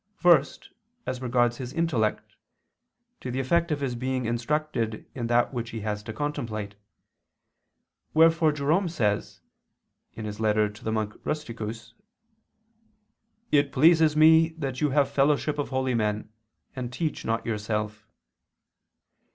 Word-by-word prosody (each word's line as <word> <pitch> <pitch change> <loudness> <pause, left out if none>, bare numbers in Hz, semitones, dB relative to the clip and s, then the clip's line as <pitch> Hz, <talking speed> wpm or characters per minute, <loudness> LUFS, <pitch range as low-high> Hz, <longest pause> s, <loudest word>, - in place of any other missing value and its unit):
First, 170 -7 +3 0.3
as 130 0 -4
regards 120 -1 +1
his 130 -1 -6
intellect, 135 -11 -1 0.8
to 130 - -6
the 125 +2 -2
effect 170 +6 +1
of 145 -1 -1
his 135 -3 -1
being 130 +1 -2
instructed 120 -1 -2
in 120 -3 -3
that 120 +2 +2
which 120 -2 -3
he 115 -1 -6
has 105 0 -3
to 110 - -7
contemplate; 110 -7 -4 1.4
wherefore 160 0 +5
Jerome 155 +6 +1
says 105 -11 -1 0.8
(ad 110 - -5
Rustic. 105 +1 -6 0.4
Monach., 110 -1 -1
Ep. 150 -6 -3
cxxv): 115 +1 -7 1.6
"It 145 -1 +3
pleases 160 +1 +4
me 160 +1 +6
that 135 -4 -4
you 150 - +3
have 140 +1 +3
the 140 - -14
fellowship 145 +1 +2
of 145 - -2
holy 130 -1 0
men, 105 -1 -1 0.4
and 125 -2 -4
teach 155 +4 -3
not 115 +1 -1
yourself." 105 -1 -3
130 Hz, 130 wpm, -26 LUFS, 110-150 Hz, 1.6 s, me